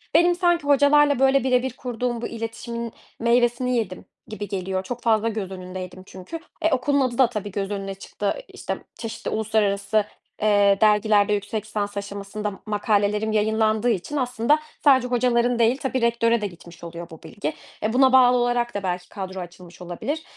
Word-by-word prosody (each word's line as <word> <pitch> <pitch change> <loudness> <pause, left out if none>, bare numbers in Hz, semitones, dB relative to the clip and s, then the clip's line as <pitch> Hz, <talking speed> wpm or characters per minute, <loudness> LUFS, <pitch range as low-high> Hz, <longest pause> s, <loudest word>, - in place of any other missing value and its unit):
Benim 345 +2 +5
sanki 345 -2 +2
hocalarla, 285 0 +5
böyle, 270 -1 +4
bire 255 -1 +2
bir 260 -2 -3
kurduğum 245 -2 -3
bu - - -2
iletişimin 230 0 -5 0.3
meyvesini 240 +1 +2
yedim 185 -5 -3 0.2
gibi 210 -1 -6
geliyor. 190 -1 -3
Çok 245 +4 -6
fazla 225 -1 +2
göz 210 -4 -4
önündeydim 185 0 -7
çünkü. 190 - -8 0.2
E, 320 - +3
okulun 275 +2 +2
adı 250 -2 0
da 260 - +6
tabii 210 -3 -5
göz 195 +1 -3
önüne 195 -1 -3
çıktı. 200 +1 -3
İşte, - - -5 0.2
çeşitli 225 -1 -5
uluslararası, 215 -1 +1 0.4
eee, 205 -2 +4
dergilerde 210 -1 +4
yüksek 205 +1 -3
lisans 205 -2 -3
aşamasında 200 +1 -4
m 195 - -10
makalelerim 210 0 +1
yayınlandığı 220 +1 +2
için 230 +7 -2
aslında 250 +3 +2 0.2
sadece 260 -4 +5
hocaların 245 -1 +2
değil, 235 +3 +3
tabii, 265 -2 -2
rektöre 235 -1 +2
de 205 - -1
gitmiş 170 -2 -14
oluyor 170 0 -8
bu 160 - -13
bilgi. 160 -1 -4 0.3
E, 215 +1 0
buna 260 0 +5
bağlı 250 -1 +6
olarak 240 0 0
da 205 - -4
belki 180 -1 -3
kadro 190 -2 -6
açılmış 175 0 -11
olabilir. 255 - -4
220 Hz, 170 wpm, -23 LUFS, 200-245 Hz, 0.4 s, da